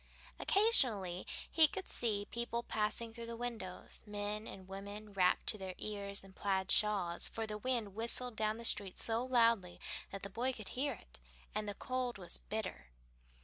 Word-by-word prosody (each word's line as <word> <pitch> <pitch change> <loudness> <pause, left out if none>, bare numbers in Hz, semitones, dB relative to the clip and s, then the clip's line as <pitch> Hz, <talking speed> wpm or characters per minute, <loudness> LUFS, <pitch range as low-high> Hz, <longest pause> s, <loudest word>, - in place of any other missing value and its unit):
Occasionally 230 - +4 0.2
he 320 -1 +7
could 385 +5 -5
see 210 -4 +2
people 235 0 -1
passing 220 +1 +1
the 235 0 -6
windows: 230 -7 -5
men 210 +1 -3
and 190 -1 -9
women 200 +2 -7
wrapped 180 -2 +3
to 215 - +2
their 190 -1 -5
ears 200 -2 0
in 195 0 -14
plaid 190 -1 0
shawls, 195 -5 +3
for 225 - -3
the 215 -1 -4
wind 230 -4 -1
whistled 235 +2 -1
down 215 0 +1
the 235 - -6
street 200 -4 +1
so 225 +1 +2
loudly 230 -8 +3 0.3
that 195 - -7
the 200 - -4
boy 250 +5 0
could 215 -4 -7
hear 280 +3 -1
it, - - -8 0.3
and 210 -1 -1
the 205 - -4
cold 255 0 -2
was 175 -3 -1
bitter. 215 - -4
215 Hz, 170 wpm, -36 LUFS, 195-235 Hz, 0.3 s, he